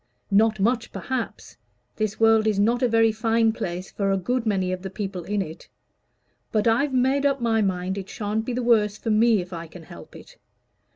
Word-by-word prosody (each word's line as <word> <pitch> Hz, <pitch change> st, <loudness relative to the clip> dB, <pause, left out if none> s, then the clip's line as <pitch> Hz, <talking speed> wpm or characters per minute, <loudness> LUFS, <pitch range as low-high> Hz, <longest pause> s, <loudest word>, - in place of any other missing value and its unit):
Not 215 Hz, +1 st, +3 dB
much, 230 Hz, +4 st, 0 dB
perhaps. 255 Hz, -3 st, -5 dB, 0.4 s
This 215 Hz, -1 st, -2 dB
world 225 Hz, -1 st, +4 dB
is 215 Hz, -2 st, +1 dB
not 230 Hz, +5 st, +2 dB
a 250 Hz, -, +3 dB
very 225 Hz, 0 st, +4 dB
fine 225 Hz, 0 st, +2 dB
place 180 Hz, -2 st, -5 dB
for 195 Hz, -1 st, -1 dB
a 195 Hz, -, +2 dB
good 240 Hz, +5 st, -2 dB
many 190 Hz, -3 st, 0 dB
of 185 Hz, 0 st, -4 dB
the 190 Hz, -, -5 dB
people 195 Hz, -2 st, -5 dB
in 205 Hz, -1 st, -1 dB
it. 160 Hz, -2 st, -11 dB, 0.8 s
But 215 Hz, 0 st, +1 dB
I've 245 Hz, +6 st, +2 dB
made 265 Hz, +2 st, +2 dB
up 275 Hz, -1 st, +2 dB
my 225 Hz, -2 st, +1 dB
mind 190 Hz, 0 st, -1 dB
it 195 Hz, -, -9 dB
shan't 215 Hz, -2 st, -2 dB
be 245 Hz, -, -4 dB
the 250 Hz, +1 st, -2 dB
worse 210 Hz, -3 st, +2 dB
for 225 Hz, -, -3 dB
me, 220 Hz, -1 st, +4 dB
if 180 Hz, +1 st, -10 dB
I 170 Hz, 0 st, -6 dB
can 165 Hz, +1 st, -12 dB
help 85 Hz, -, -13 dB
it. -, -, -14 dB
215 Hz, 210 wpm, -24 LUFS, 195-230 Hz, 0.8 s, world